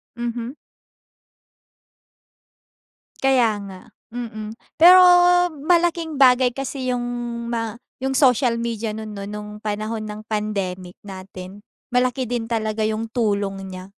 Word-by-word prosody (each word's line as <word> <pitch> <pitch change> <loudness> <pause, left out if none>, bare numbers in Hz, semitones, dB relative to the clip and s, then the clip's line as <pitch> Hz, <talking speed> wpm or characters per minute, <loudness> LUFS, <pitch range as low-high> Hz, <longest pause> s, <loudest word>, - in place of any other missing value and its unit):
Mhm. 240 +1 -4 2.7
Kaya 245 -6 +3
nga. 190 -2 -10 0.3
Mm. 220 -3 -6 0.2
Pero 360 +3 +9 0.6
malaking 335 0 +1
bagay 255 -2 +5
kasi 260 -1 -3
yung, 245 -1 -2 0.5
ma 230 -1 -3 0.3
yung 265 - 0
social 250 -3 +3
media 230 -2 -3
no'n 215 -1 -7
'no? 200 - -6
No'ng 210 +1 -7
panahon 215 +1 -3
ng 210 0 -7
pandemic 195 -4 -3
natin. 190 0 -10 0.3
Malaki 250 +1 +1
din 240 -1 -2
talaga 220 -1 -1
yung 220 +1 -2
tulong 200 -5 -1
niya. 185 0 -8
225 Hz, 110 wpm, -22 LUFS, 210-250 Hz, 2.7 s, Pero